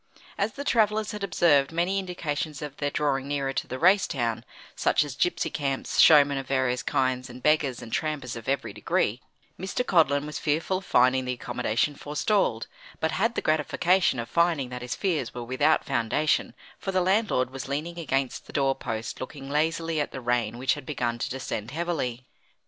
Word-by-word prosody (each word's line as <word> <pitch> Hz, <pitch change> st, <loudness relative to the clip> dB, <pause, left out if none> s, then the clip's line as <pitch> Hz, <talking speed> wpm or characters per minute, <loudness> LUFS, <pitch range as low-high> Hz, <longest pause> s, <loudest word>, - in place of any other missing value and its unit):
As 210 Hz, +2 st, -1 dB
the 285 Hz, -, -5 dB
travellers 215 Hz, -4 st, +2 dB
had 210 Hz, -1 st, -6 dB
observed 145 Hz, -8 st, +3 dB
many 175 Hz, +4 st, +1 dB
indications 155 Hz, -5 st, -4 dB
of 145 Hz, -1 st, -7 dB
their 145 Hz, -, -1 dB
drawing 140 Hz, -2 st, 0 dB
nearer 140 Hz, -1 st, -1 dB
to -, -, -2 dB
the 130 Hz, -, -4 dB
race 190 Hz, +6 st, +4 dB
town, 115 Hz, -4 st, -2 dB, 0.3 s
such -, -, +2 dB
as 145 Hz, -3 st, -7 dB
gypsy 175 Hz, -, 0 dB
camps, 135 Hz, -2 st, -2 dB
showmen 145 Hz, -3 st, +7 dB
of 135 Hz, -, -7 dB
various 130 Hz, -2 st, +1 dB
kinds, 130 Hz, 0 st, 0 dB
and 125 Hz, +1 st, -11 dB
beggars 150 Hz, -5 st, +2 dB
and 115 Hz, -, -9 dB
trampers 150 Hz, -6 st, -2 dB
of 115 Hz, +2 st, -6 dB
every 135 Hz, -6 st, -1 dB
degree, 105 Hz, +2 st, 0 dB, 0.4 s
Mr. 190 Hz, +7 st, -2 dB
Codlin 145 Hz, -, +3 dB
was 150 Hz, -, -5 dB
fearful 160 Hz, +5 st, 0 dB
of 190 Hz, -, -15 dB
finding 130 Hz, +1 st, +3 dB
the 125 Hz, -, -1 dB
accommodation 125 Hz, +2 st, -1 dB
forestalled; 150 Hz, -, 0 dB, 0.3 s
but 160 Hz, -, 0 dB
had 230 Hz, +5 st, 0 dB
the -, -, -2 dB
gratification 165 Hz, +2 st, +2 dB
of 120 Hz, 0 st, -3 dB
finding 170 Hz, -6 st, +1 dB
that 125 Hz, 0 st, -6 dB
his 125 Hz, 0 st, -4 dB
fears 160 Hz, -, -1 dB
were 120 Hz, -, -4 dB
without 145 Hz, +6 st, +2 dB
foundation, 120 Hz, +6 st, 0 dB, 0.2 s
for 195 Hz, -, -3 dB
the 185 Hz, -, +2 dB
landlord 185 Hz, -, +1 dB
was 135 Hz, 0 st, -6 dB
leaning 155 Hz, +5 st, -3 dB
against 135 Hz, -4 st, -2 dB
the -, -, -12 dB
door 135 Hz, -2 st, +2 dB
post, 110 Hz, -3 st, -5 dB
looking 135 Hz, +1 st, -7 dB
lazily 160 Hz, +1 st, 0 dB
at 145 Hz, -, -3 dB
the 130 Hz, -, -6 dB
rain 120 Hz, -2 st, 0 dB
which 130 Hz, +1 st, +2 dB
had -, -, -7 dB
begun 120 Hz, -4 st, -2 dB
to -, -, -2 dB
descend 120 Hz, -4 st, -4 dB
heavily. 135 Hz, -6 st, -3 dB
145 Hz, 190 wpm, -26 LUFS, 130-165 Hz, 0.4 s, showmen